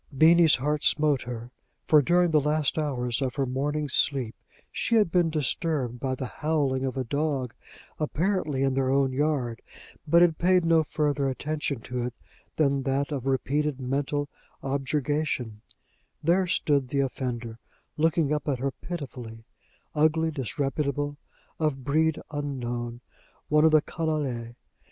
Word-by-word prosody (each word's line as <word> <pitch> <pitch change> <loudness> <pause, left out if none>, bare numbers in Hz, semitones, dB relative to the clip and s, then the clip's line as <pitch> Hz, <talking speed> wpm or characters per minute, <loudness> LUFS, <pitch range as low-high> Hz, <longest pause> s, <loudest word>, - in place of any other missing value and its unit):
Beenie's 165 +1 +6
heart 150 +3 -1
smote 150 -3 +3
her; 120 0 -7 0.3
for 150 -1 +6
during 175 +4 +3
the 155 - +5
last 150 0 +1
hours 125 -5 -1
of 130 -2 -1
her 135 -1 0
morning's 140 +2 -1
sleep 130 -6 +2 0.4
she 230 - 0
had 210 -7 +3
been 175 -2 +3
disturbed 150 -4 -1
by 130 0 -1
the 130 - -4
howling 140 -2 -1
of 135 0 -2
a 130 - 0
dog, 140 -1 -1 0.5
apparently 155 -3 0
in 135 -1 +2
their 130 -1 +1
own 135 -1 +2
yard, 130 -5 -1 0.5
but 170 +3 +6
had 165 -3 +2
paid 180 0 +3
no 165 -1 +5
further 145 -2 0
attention 145 -1 -3
to 125 +1 -4
it 125 0 -4 0.4
than 140 -3 +2
that 135 +2 -1
of 135 -3 -3
repeated 140 +2 0
mental 140 +2 -1 0.4
objurgation: 135 -4 -1 0.6
there 180 +4 +3
stood 145 -5 +1
the 140 +2 -1
offender, 120 -4 -4 0.4
looking 160 -1 +2
up 150 -1 -2
at 140 -3 +1
her 135 +2 -1
pitifully 125 -9 -8 0.5
ugly, 160 +1 +2
disreputable, 145 +1 -2 0.4
of 150 -4 -1
breed 155 +3 +1
unknown, 120 -5 -4 0.5
one 150 0 +4
of 160 - +7
the 155 -1 +5
_canaille! 140 -8 -3
145 Hz, 145 wpm, -27 LUFS, 130-155 Hz, 0.6 s, of